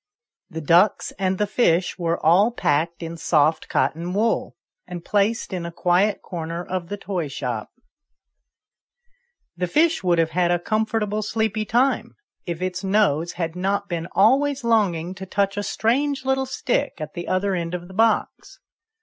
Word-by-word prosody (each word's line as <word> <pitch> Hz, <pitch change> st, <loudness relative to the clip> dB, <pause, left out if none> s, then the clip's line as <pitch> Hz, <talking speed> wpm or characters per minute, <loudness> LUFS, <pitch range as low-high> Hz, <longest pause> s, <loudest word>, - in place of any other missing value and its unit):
The 160 Hz, 0 st, -6 dB
ducks 175 Hz, +7 st, +3 dB
and 190 Hz, -1 st, 0 dB
the 210 Hz, -, +1 dB
fish 185 Hz, -5 st, +1 dB
were 170 Hz, -1 st, 0 dB
all 185 Hz, +7 st, +5 dB
packed 170 Hz, -6 st, -1 dB
in 165 Hz, 0 st, -6 dB
soft 160 Hz, -1 st, +1 dB
cotton 170 Hz, +3 st, -1 dB
wool, 225 Hz, +2 st, 0 dB, 0.3 s
and 175 Hz, -1 st, -7 dB
placed 210 Hz, +1 st, 0 dB
in 180 Hz, -2 st, -3 dB
a 170 Hz, -, -5 dB
quiet 180 Hz, +5 st, +1 dB
corner 170 Hz, 0 st, -5 dB
of 185 Hz, -2 st, -4 dB
the 205 Hz, -, -4 dB
toy 185 Hz, -6 st, -3 dB
shop. 125 Hz, -5 st, -4 dB, 1.9 s
The 180 Hz, +1 st, -2 dB
fish 320 Hz, -, +2 dB
would 175 Hz, -2 st, +2 dB
have 165 Hz, -1 st, +1 dB
had 175 Hz, +1 st, +1 dB
a 175 Hz, -, +3 dB
comfortable 215 Hz, +2 st, -1 dB
sleepy 215 Hz, 0 st, -1 dB
time 250 Hz, +6 st, +1 dB, 0.3 s
if 170 Hz, +1 st, -3 dB
its 185 Hz, +1 st, -3 dB
nose 190 Hz, -5 st, +1 dB
had 165 Hz, -1 st, -3 dB
not 200 Hz, +2 st, -1 dB
been 170 Hz, -1 st, -3 dB
always 270 Hz, +6 st, +3 dB
longing 190 Hz, -7 st, +1 dB
to 190 Hz, 0 st, -9 dB
touch 195 Hz, +1 st, 0 dB
a 205 Hz, -, -1 dB
strange 265 Hz, +7 st, 0 dB
little 265 Hz, 0 st, +1 dB
stick 260 Hz, 0 st, -1 dB
at 155 Hz, -1 st, -6 dB
the 175 Hz, -, -6 dB
other 190 Hz, +1 st, 0 dB
end 170 Hz, -1 st, -2 dB
of 175 Hz, 0 st, -7 dB
the 190 Hz, -, -12 dB
box. 225 Hz, +3 st, 0 dB
185 Hz, 165 wpm, -23 LUFS, 170-215 Hz, 1.9 s, all